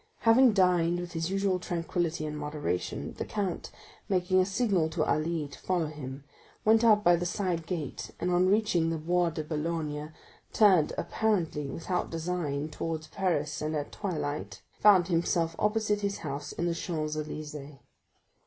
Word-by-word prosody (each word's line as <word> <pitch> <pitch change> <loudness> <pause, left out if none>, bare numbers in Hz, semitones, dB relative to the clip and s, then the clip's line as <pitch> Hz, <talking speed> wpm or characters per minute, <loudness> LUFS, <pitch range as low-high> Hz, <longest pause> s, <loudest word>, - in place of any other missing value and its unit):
Having 235 +1 +6
dined 175 -3 +3
with 175 0 -6
his 165 0 -2
usual 195 -1 +1
tranquillity 170 -2 -2
and 150 0 -4
moderation, 150 - -3
the - - 0
count, 195 -5 -3 0.4
making 185 -1 +2
a 185 - +3
signal 195 -6 +1
to 160 -1 0
Ali 155 0 0
to 140 - -12
follow 180 -3 0
him, 140 -3 -7 0.4
went 220 +1 +5
out 215 -2 +5
by 175 -2 +6
the 175 +1 -2
side 175 -3 -2
gate 160 -7 -4
and 180 - 0
on 180 +1 +3
reaching 195 -6 +2
the 165 - -1
Bois 175 +2 +1
de 160 -1 -4
Boulogne 150 -1 -3 0.4
turned, 190 -8 +5
apparently 175 -9 0
without 170 +6 -2
design 160 -3 -2
towards 155 0 -4
Paris 155 -5 -1
and 155 +1 -2
at 145 -1 -3
twilight; 150 -7 -4 0.2
found 195 -5 +6
himself 165 -1 +1
opposite 210 -1 +1
his 200 -1 -1
house 145 0 -4
in 170 - -3
the 170 - +1
Champs 155 -3 -3
Élysées. 150 -2 -6
170 Hz, 160 wpm, -29 LUFS, 155-185 Hz, 0.4 s, Having